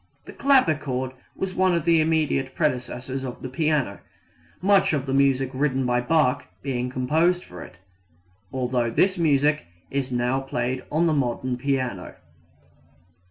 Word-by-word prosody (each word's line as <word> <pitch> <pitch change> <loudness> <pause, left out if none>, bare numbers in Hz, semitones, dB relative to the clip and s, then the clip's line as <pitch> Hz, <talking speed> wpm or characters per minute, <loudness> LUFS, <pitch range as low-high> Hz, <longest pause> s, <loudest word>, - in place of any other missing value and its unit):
The - - -10
clavichord 150 - +2 0.2
was 190 -1 -3
one 185 -1 +2
of 170 - -1
the 165 -2 +4
immediate 155 -4 0
predecessors 130 -2 -2
of 125 -2 -7
the 130 - -4
piano, 145 - 0 0.6
much 195 -2 +3
of 140 -3 -1
the 135 - -2
music 135 -1 +2
written 135 -1 0
by 125 0 +1
Bach 145 -1 +1 0.2
being 125 -2 -2
composed 160 +8 +1
for 90 -1 -11
it, 85 - -12 0.7
although 125 -2 0
this 185 +10 +2
music 150 - +2 0.2
is 135 -1 -2
now 125 +2 +1
played 130 -1 -3
on 160 +3 +2
the 165 - +2
modern 130 -2 -1
piano. 130 -7 -2
135 Hz, 145 wpm, -24 LUFS, 125-155 Hz, 0.7 s, the